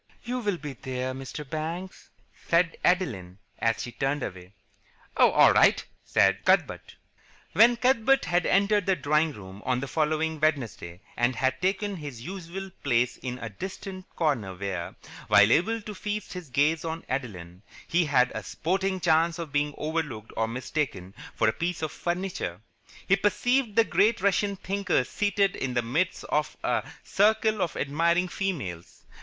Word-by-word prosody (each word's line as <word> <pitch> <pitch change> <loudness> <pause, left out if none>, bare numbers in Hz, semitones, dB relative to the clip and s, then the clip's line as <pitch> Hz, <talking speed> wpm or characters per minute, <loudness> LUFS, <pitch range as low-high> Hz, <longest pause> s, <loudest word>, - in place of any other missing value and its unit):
"You 250 +1 -3
will 205 -6 -1
be 145 -3 -7
there, 130 0 -4
Mr. 135 +2 -7
Banks?" 165 +6 -5 0.4
said 170 0 +3
Adeline, 110 - 0 0.2
as 115 0 +1
he 120 - -6
turned 135 +3 -1
away. 90 +1 -7 0.6
"Oh, - - +6
all - - +6
right," - - +4 0.2
said - - +2
Cuthbert. - - +1 0.6
When 230 +6 +6
Cuthbert 260 +1 +3
had 175 0 +1
entered 200 0 +3
the 190 - +4
drawing 150 +1 +1
room 95 -3 -11
on 125 -1 0
the 135 - -4
following 155 +1 0
Wednesday 120 - -1
and 120 +2 +1
had 130 +3 0
taken 195 +1 0
his 145 -7 -7
usual 190 +2 -7
place 125 -2 +1
in 125 -1 -5
a 115 - -6
distant 185 - -7
corner 120 - 0
where, 90 -2 -4 0.3
while 105 +2 +6
able 225 - +2
to 210 0 -7
feast 210 +1 -4
his 180 -5 -8
gaze 150 +5 +2
on 165 0 -5
Adeline, 95 -9 -5 0.3
he 175 0 +2
had 125 -4 +3
a 110 - -4
sporting 190 - -1
chance 165 0 +2
of 165 -4 -6
being 145 0 0
overlooked 150 -9 -3
or 110 0 0
mistaken 120 - -3 0.2
for 110 - +2
a 110 - +3
piece 175 -1 -3
of 155 - -2
furniture, 175 - -3 0.5
he 195 - +5
perceived 225 +3 +1
the 230 - +6
great 210 +3 +2
Russian 200 +1 +1
thinker 195 -6 0
seated 200 +5 0
in 125 -1 -3
the 120 - +2
midst 160 +11 -1
of 150 -1 -1
a - - 0
circle 215 +1 +2
of 175 - -1
admiring 170 +5 +1
females. 140 - -4
160 Hz, 160 wpm, -27 LUFS, 125-190 Hz, 0.6 s, Oh